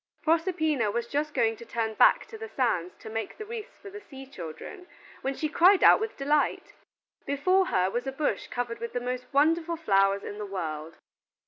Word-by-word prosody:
Proserpina 315 - +1
was 235 +2 -2
just 295 +4 -2
going 225 -3 +2
to - - -10
turn 225 -1 -2
back - - +5
to 455 - -9
the 445 0 -7
sands 185 - -1
to - - -10
make 225 0 -5
the 430 - -7
wreaths 455 +1 -8
for 400 - -11
the 415 +1 -9
sea 270 -8 -11
children, 270 - -9 0.3
when 270 +1 -2
she 310 - -1
cried 360 +6 +5
out - - +8
with 440 0 -4
delight. 290 +1 0 0.5
Before 365 +7 +2
her 185 0 +2
was 245 +4 -3
a - - -1
bush 290 +2 -2
covered 245 -1 -4
with 235 - -6
the 245 - -1
most 250 0 -4
wonderful 325 +4 +2
flowers 195 -9 +2
in 205 - -7
the 210 - -4
world. 160 -4 -5
270 Hz, 200 wpm, -27 LUFS, 225-330 Hz, 0.5 s, out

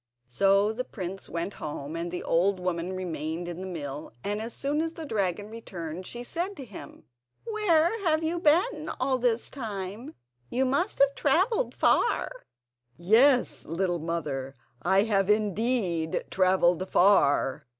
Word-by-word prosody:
So 195 - +3
the 250 +3 -3
prince 190 -4 -6
went 170 +4 -3
home, 150 0 -5
and 170 +1 -3
the 175 +1 -5
old 185 +3 +2
woman 180 0 -2
remained 170 -2 -4
in 175 +1 -6
the 190 - -5
mill, 150 -4 -6
and 205 +1 -2
as 230 +2 -4
soon 285 +5 -1
as 325 0 -2
the 325 -2 -7
dragon 205 - -1
returned 180 -6 -7
she 240 0 -5
said 350 +9 -3
to 270 - -7
him: 205 -5 -11 0.4
"Where 425 -3 +2
have 315 -1 +2
you 335 +2 -1
been 335 +2 +2
all 260 0 +1
this 240 -1 +1
time—you 205 - -5
must 280 +10 0
have 280 0 +4
travelled 380 - +1
far?" - - +2 0.7
"Yes, 245 +9 +4
little 175 +1 -1
mother, 145 -5 -3 0.3
I 190 +5 +3
have 200 -3 +1
indeed 210 -5 +1
travelled 185 -1 +2
far." 145 -9 +3
200 Hz, 145 wpm, -27 LUFS, 170-270 Hz, 0.7 s, have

